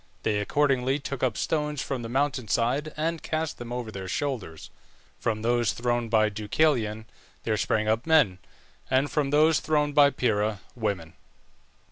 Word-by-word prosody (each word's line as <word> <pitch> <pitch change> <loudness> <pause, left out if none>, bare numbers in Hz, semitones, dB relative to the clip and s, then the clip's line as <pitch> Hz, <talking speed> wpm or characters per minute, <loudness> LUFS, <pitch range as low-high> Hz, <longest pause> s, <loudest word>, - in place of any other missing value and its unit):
They 105 -1 +1
accordingly 135 +3 +1
took 140 -2 -6
up 125 -4 0
stones 150 -2 -1
from 135 -3 -3
the 115 - -6
mountain 135 -2 0
side 130 +9 0
and 165 +1 -1
cast 160 0 -3
them 120 0 -7
over 120 -2 -4
their 95 -2 -6
shoulders. 105 - -4 0.5
From 110 -1 -2
those 120 -1 +2
thrown 120 -1 -1
by 110 -1 +4
Deucalion 110 0 0 0.4
there 110 - 0
sprang 110 0 0
up 110 +6 0
men, 150 - +4 0.5
and 130 +2 +2
from 145 -3 0
those 155 +2 +4
thrown 150 -1 0
by 145 -1 +6
Pyrrha, 110 -5 0
women. 100 -8 -3
120 Hz, 155 wpm, -26 LUFS, 110-145 Hz, 0.5 s, by